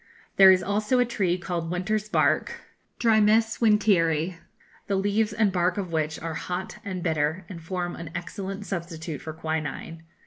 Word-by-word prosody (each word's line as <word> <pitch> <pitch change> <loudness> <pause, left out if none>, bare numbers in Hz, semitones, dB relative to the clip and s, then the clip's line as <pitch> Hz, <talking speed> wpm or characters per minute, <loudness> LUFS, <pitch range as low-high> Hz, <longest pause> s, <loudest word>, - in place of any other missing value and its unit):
There 195 -1 +9
is 185 -1 +5
also 210 +6 +1
a 245 - +4
tree 190 -7 0
called 175 -2 -4
Winter's 210 +4 -1
Bark - - +2 0.5
(Drimys 220 0 +3
Winteri), 185 -7 +2 0.5
the 200 - 0
leaves 205 +3 +1
and 210 -1 +2
bark 180 0 +1
of 190 -4 -3
which 155 -1 -1
are 165 -1 -4
hot 180 +4 -5
and 185 -3 -5
bitter, 160 +1 0
and 180 -4 -9
form 175 +1 -3
an 165 -2 -7
excellent 195 +3 -5
substitute 165 -5 -5
for 160 - -6
quinine. 160 0 -4
185 Hz, 160 wpm, -26 LUFS, 165-205 Hz, 0.5 s, There